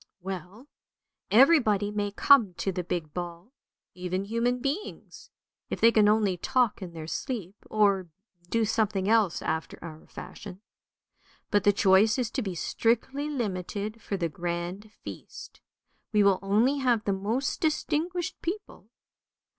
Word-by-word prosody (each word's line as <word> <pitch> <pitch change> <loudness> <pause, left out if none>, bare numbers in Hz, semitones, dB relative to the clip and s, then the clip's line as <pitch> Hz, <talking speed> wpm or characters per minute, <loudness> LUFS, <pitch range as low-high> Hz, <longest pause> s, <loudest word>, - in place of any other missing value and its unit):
" - - -64
Well, 190 - -7 0.6
everybody 220 -6 +5
may 205 -1 -1
come 210 -2 +4
to 195 - -2
the 180 -1 -3
big 165 -4 -4
ball, 175 +4 -6 0.4
even 185 +1 -3
human 235 +3 0
beings, 280 +11 -5 0.4
if - - -3
they 230 - +6
can 210 -2 +5
only 210 -4 +2
talk 245 +4 +1
in 180 -3 -7
their 160 -1 -7
sleep, 200 - -4 0.2
or 200 -4 +2 0.4
do 230 +1 +2
something 210 -3 0
else 215 -5 +2
after 160 0 -3
our 160 -2 -10
fashion. 195 -2 -10 0.9
But 205 -2 +2
the 205 - +7
choice 200 +3 +4
is 240 -4 -1
to 265 - -2
be 190 -6 -4
strictly 255 - 0
limited 210 -3 -3
for 200 - -3
the 170 -2 0
grand 175 +5 -4
feast. - - -10 0.5
We 210 -2 +4
will 195 -2 +4
only 220 +8 +2
have 245 -5 +2
the 200 - 0
most 220 +8 -2
distinguished 325 +2 -1
people. 345 - -6
205 Hz, 145 wpm, -28 LUFS, 185-235 Hz, 0.9 s, the